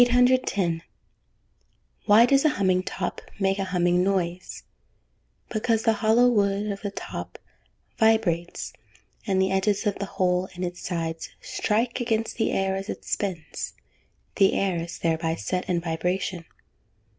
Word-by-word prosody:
810. 245 -9 +2 1.3
Why 215 +3 +8
does 275 +2 +4
a 310 - +5
humming 190 -7 +2
top 185 0 -4 0.2
make 195 0 +1
a 195 - 0
humming 180 -1 +2
noise? 185 -2 -2 0.9
Because 225 0 0
the 225 - +4
hollow 230 +3 +5
wood 205 -2 +1
of 200 - -6
the 205 - -2
top 200 - -7 0.6
vibrates, 215 -7 +1 0.5
and 190 -2 +2
the 190 0 +2
edges 195 +1 +1
of 205 - 0
the 200 - -3
hole 180 0 +1
in 180 - -4
its 175 0 -4
sides 165 -2 -3
strike 230 +4 -1
against 225 -1 -1
the 225 - +1
air 195 0 0
as 195 +2 -5
it - - -6
spins; 175 -6 -3 0.6
the 195 -1 +5
air 190 -3 +1
is 165 0 -5
thereby 165 0 0
set 180 +2 -3
in 175 -1 +2
vibration. 175 +1 -2
195 Hz, 145 wpm, -25 LUFS, 180-215 Hz, 1.3 s, Why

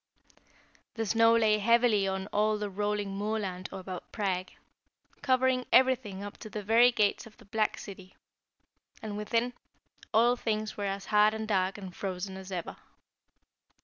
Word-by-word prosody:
The 225 -1 -2
snow 225 +2 +4
lay 215 -2 +3
heavily 230 -2 +3
on 190 0 -2
all 215 +1 +2
the 210 -1 -4
rolling 205 0 -2
moorland 200 -3 -3
about 185 -2 -7
Prague, 185 -4 -2 0.7
covering 255 -1 +2
everything 250 -7 +3
up 205 0 -8
to 215 - -9
the 210 0 -5
very 230 +4 +5
gates 210 -1 0
of 215 - -18
the - - -18
black 215 +2 0
city; 190 -2 -11 0.9
and 210 -2 -5
within, 230 +4 -1 0.6
all 235 +3 +4
things 215 -2 -2
were 205 - -3
as 195 0 -3
hard 210 0 +4
and 220 0 -4
dark 190 -2 0
and 190 -3 -9
frozen 190 0 -4
as 190 0 -9
ever. 175 -3 -5
210 Hz, 150 wpm, -29 LUFS, 195-225 Hz, 0.9 s, very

